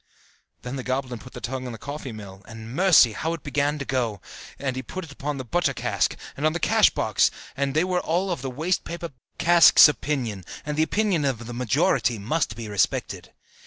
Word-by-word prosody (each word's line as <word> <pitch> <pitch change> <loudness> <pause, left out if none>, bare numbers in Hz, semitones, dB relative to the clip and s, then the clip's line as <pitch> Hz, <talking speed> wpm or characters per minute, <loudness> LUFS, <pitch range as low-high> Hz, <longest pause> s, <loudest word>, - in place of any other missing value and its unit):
Then 125 +2 -5
the 130 - -5
goblin 130 -2 -3
put 130 - -13
the - - -7
tongue 130 +1 -4
upon 125 - -5
the - - -7
coffee 140 +2 -7
mill, 100 -3 -10
and, 115 0 -9
mercy! 175 -8 +6
how 160 +9 -3
it 165 - -7
began 145 +1 0
to 140 - -5
go! 120 -6 -1 0.4
And 130 -2 -3
he 130 - -3
put 185 +7 -7
it 150 - -13
upon 140 +1 -4
the 130 - -6
butter 140 0 0
cask, - - 0 0.2
and 140 - -6
on 155 0 +3
the 175 - -2
cash - - +4
box: - - +2 0.3
they 140 +3 +1
were 180 -1 0
all 180 +4 -1
of 170 - -3
the 135 - -4
waste 160 +8 -1
paper 170 -1 -6 0.3
cask's 170 -2 +8
opinion, 130 -10 -2 0.2
and 150 0 -3
the 155 - +1
opinion 190 -1 +1
of 125 -4 -2
the 120 - -7
majority 125 - +1
must 110 +2 -1
be 115 -1 -7
respected. 105 -3 -1
135 Hz, 210 wpm, -24 LUFS, 120-160 Hz, 0.4 s, cask's